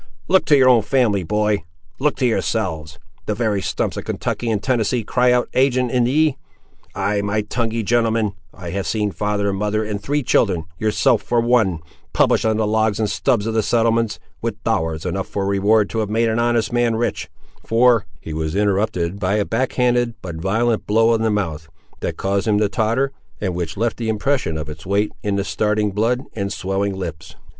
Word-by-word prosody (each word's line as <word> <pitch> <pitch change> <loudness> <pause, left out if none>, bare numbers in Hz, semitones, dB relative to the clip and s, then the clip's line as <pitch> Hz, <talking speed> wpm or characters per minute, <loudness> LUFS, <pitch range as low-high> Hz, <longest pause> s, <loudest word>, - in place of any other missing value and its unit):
Look 190 0 +4
to 145 - +5
your 130 -1 +5
own 125 -3 +6
family, 105 -3 +1
boy; 105 +1 0 0.4
look 150 +2 +1
to 130 - -1
yourselves. 90 -9 -1 0.3
The 105 - 0
very 105 -3 0
stumps - - -2
of - - -4
Kentucky 120 - -3
and 110 -2 +1
Tennessee 120 -2 +1
cry 125 +3 +2
out 125 0 +2
ag'in 130 -2 +2 0.2
ye! 150 +1 +2 0.6
Ay, 100 0 0
my 100 +1 0
tonguey 115 +1 -2
gentleman, 115 -1 +1 0.2
I 85 -2 -8
have 100 +1 -3
seen 105 -2 0
father 105 +1 -1
and 95 -1 -2
mother 105 +1 0
and 105 -1 -4
three 145 +6 -1
children, 95 -8 +2 0.2
yourself 105 0 +2
for 120 +3 0
one, 115 -8 +2 0.3
published - - +3
on 110 -1 +2
the 110 - +1
logs 110 0 +1
and 110 - +1
stubs 105 +1 0
of 115 - -1
the 110 - +2
settlements, 115 0 +1 0.2
with - - -4
dollars 80 0 -1
enough 95 +2 -2
for 100 -1 -3
reward 100 +2 +3
to 115 - -2
have 105 -2 -1
made 115 +2 +1
an 110 +1 0
honest 120 -1 +1
man 120 -1 +2
rich, 120 +1 -2 0.3
for—" 115 -2 +3
He 80 - -7
was 80 +1 -3
interrupted 100 -3 0
by 100 +1 0
a 105 -1 +1
back 125 +3 -1
handed 120 -2 +1
but 85 -3 -6
violent 110 +6 0
blow 115 +2 +4
on 115 - +1
the 110 - +2
mouth, 80 -7 -2 0.3
that - - -3
caused 100 +2 -1
him 105 -1 +3
to 105 -1 +2
totter, 115 +7 0 0.3
and 95 -3 -2
which 85 -1 -4
left 115 +2 0
the 115 -2 -3
impression 110 - 0
of 75 - -5
its 80 +1 -9
weight 100 +3 0
in 100 -1 -1
the 100 - 0
starting 105 0 0
blood 115 +5 0
and 100 -3 -3
swelling 95 +1 -2
lips. 80 -5 -7
105 Hz, 200 wpm, -20 LUFS, 100-115 Hz, 0.6 s, own